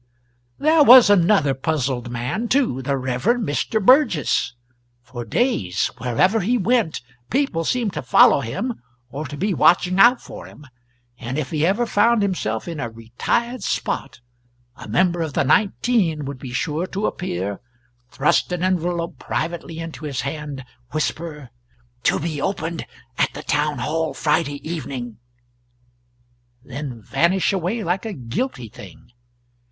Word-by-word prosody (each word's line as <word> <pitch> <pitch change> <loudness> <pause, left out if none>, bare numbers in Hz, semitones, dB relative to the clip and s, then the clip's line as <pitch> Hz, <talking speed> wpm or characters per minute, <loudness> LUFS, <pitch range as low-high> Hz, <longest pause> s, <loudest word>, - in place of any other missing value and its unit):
There 310 +1 +4
was 250 -5 +9
another 175 -6 +4
puzzled 135 -3 -2
man, 125 - -3
too 245 - +1
the 135 +1 -1
Rev. 130 -1 -3
Mr. 220 - 0
Burgess. 250 - +3 0.5
For 125 -1 -7
days, 110 - 0
wherever 125 - +2
he 230 +6 +1
went, 225 - +1 0.3
people 255 - 0
seemed 230 +1 -1
to - - -3
follow 130 - +5
him 220 - -4 0.3
or 145 +2 -5
to 145 +2 -8
be 200 +6 0
watching 180 +2 +3
out 240 +5 +7
for - - -10
him; 150 - -15 0.5
and 130 +2 -4
if 145 -4 -3
he 155 -2 0
ever 215 +6 +1
found 230 0 +3
himself 145 - -2
in 165 -3 -5
a 120 - -3
retired 120 - -2
spot, 125 - -3 0.5
a - - -11
member 175 - +1
of 160 -3 -3
the - - +1
nineteen 195 - +1
would 140 -1 -6
be 125 -1 -8
sure 155 +7 -2
to 200 +3 -3
appear, 100 - -3 0.5
thrust 145 +6 +1
an 180 0 -2
envelope 175 -3 -1
privately 165 0 -4
into 165 -1 -7
his 140 -4 -3
hand, 140 -2 -5 0.3
whisper 155 -3 -3 0.5
"To - - +3
be 155 -2 -3
opened 165 -5 -3 0.3
at - - +2
the - - -7
town 150 0 0
hall 160 +5 -2
Friday 150 -1 -1
evening," 130 -9 -5 1.4
then 130 -4 -7
vanish 185 - +1
away 195 +5 -1
like 180 +3 -1
a 220 -2 -4
guilty 125 - -4
thing. 110 - -14
160 Hz, 145 wpm, -21 LUFS, 130-200 Hz, 1.4 s, was